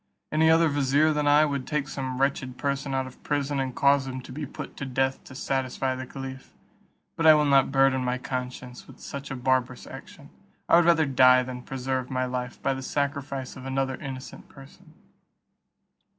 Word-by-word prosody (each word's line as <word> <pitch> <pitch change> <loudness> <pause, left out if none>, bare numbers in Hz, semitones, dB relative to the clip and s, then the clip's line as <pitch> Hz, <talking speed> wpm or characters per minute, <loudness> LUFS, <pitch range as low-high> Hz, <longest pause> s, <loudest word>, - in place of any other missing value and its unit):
Any 160 +1 +4
other 165 +1 +5
vizier 145 +1 +2
than 150 -1 0
I 145 +1 +6
would 140 -3 -3
take 150 -3 -1
some 130 -2 -4
wretched 130 -2 -1
person 140 -1 -2
out 130 0 0
of 130 - -12
prison, 145 -1 -1
and 130 -1 -3
cause 140 -1 +3
him 130 0 -5
to 125 - -12
be 145 +2 -5
put - - -8
to 135 - -4
death 130 +1 -1
to 130 - -12
satisfy 130 -1 -1
the 130 0 -6
caliph; 130 0 -9 0.6
but 165 - +2
I 155 - +10
will 150 0 +3
not 135 -2 +4
burden 135 -1 +3
my 125 0 -1
conscience 125 -1 -6
with - - -15
such 140 0 -7
a 135 - -4
barbarous 130 -1 0
action; - - -12 0.4
I - - +6
will 175 - +4
rather 165 -2 +4
die 130 -2 +5
than 125 0 -7
preserve 130 0 -3
my 130 -1 -1
life 125 -1 -4
by 135 - +1
the 135 - -6
sacrifice 140 -1 -3
of 130 0 -9
another 135 0 -1
innocent 130 -1 -8
person." 155 +4 -16
135 Hz, 195 wpm, -26 LUFS, 130-140 Hz, 0.6 s, I